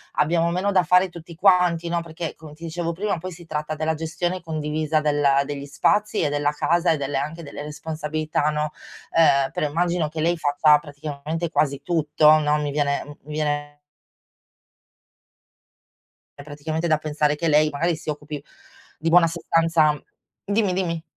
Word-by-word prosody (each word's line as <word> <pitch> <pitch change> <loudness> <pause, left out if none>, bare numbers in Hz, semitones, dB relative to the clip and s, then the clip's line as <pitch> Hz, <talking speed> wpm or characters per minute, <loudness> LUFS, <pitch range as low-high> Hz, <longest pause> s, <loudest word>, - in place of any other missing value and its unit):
abbiamo 165 +3 +2
meno 185 +4 0
da 190 -2 +4
fare 180 +3 +4
tutti 170 -1 -11
quanti", 180 -2 +3
no, 170 0 0
perché 165 -1 -6
come 155 -1 -12
ti 165 - -15
dicevo 170 +1 -3
prima 195 +3 -2
poi 185 +3 -6
si 170 0 -12
tratta 155 -1 -3
della 160 +1 0
gestione 170 +3 -3
condivisa 155 -1 -1
della 145 -2 +2
degli 140 -1 -5
spazi, 210 +9 +1
e 150 - +1
della 145 0 0
casa, 170 +3 +1
e 160 - +1
delle 140 0 -2
anche 155 +5 -4
delle 145 -1 -8
responsabilità, 155 0 -2
no, 150 0 -1 0.4
uhm, 140 -5 +4
però 150 - -1
immagino 170 0 0
che 155 0 -4
lei 170 +2 +2
faccia 150 0 +4
praticamente 150 +2 -5
quasi 145 -2 0
tutto, 155 -2 +4
no, 150 0 +2
mi 145 -1 -2
viene 140 -1 0
m - - -13 0.2
mi 150 - -8
viene 145 -1 -2 2.6
È 145 - -9
praticamente 155 +3 -3
da 155 - +3
pensare 150 -1 0
che 165 +3 -2
lei 155 0 +4
magari 165 +4 0
si 160 0 -8
occupi 150 -1 -5 0.5
di 165 - -1
buona 170 0 +6
sostanza 165 -3 +2 0.4
dimmi, 205 -1 +1
dimmi. 170 -3 -2
155 Hz, 165 wpm, -23 LUFS, 150-170 Hz, 2.6 s, buona